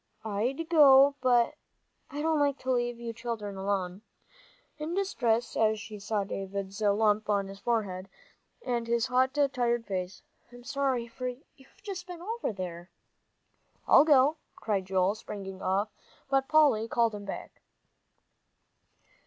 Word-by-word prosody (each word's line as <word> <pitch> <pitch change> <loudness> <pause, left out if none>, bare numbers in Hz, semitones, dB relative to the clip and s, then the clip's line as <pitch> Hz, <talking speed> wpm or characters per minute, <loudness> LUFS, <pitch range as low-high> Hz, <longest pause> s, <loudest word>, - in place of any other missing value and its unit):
"I'd 240 +10 -2
go, 280 -4 +7
but 245 -2 +3 0.6
I 290 +1 -4
don't 320 -1 +2
like 285 -1 +2
to 260 - -1
leave 240 -1 0
you 235 -1 -5
children 220 -4 -5
alone," 190 -1 -2 0.8
in 315 +3 -3
distress 240 - 0
as 220 -1 +2
she 210 0 -9
saw 205 0 -1
Davie's 195 +1 -5
lump 210 +1 +2
on 200 -1 +2
his 195 0 -10
forehead, 195 -6 -2 0.6
and 240 -2 -1
his 235 0 +1
hot, 260 +1 +1 0.2
tired 240 -2 0
face. 185 -1 -4 0.3
"I'm 245 0 -13
sorry, 270 -3 -1
for 250 +2 -5
you've 265 +7 -12
just 380 -3 -6
been 355 -2 -8 0.2
over." 180 -3 -4 1.0
"I'll - - +8
go," 290 0 +5 0.2
cried 200 -4 -2
Joel, 190 +1 +2
springing 195 -3 -8
off, 200 +3 0 0.4
but 270 0 +2
Polly 290 -8 +4
called 230 -1 +1
him 205 -1 -7
back. 195 - -8
230 Hz, 135 wpm, -29 LUFS, 200-265 Hz, 1.0 s, I'll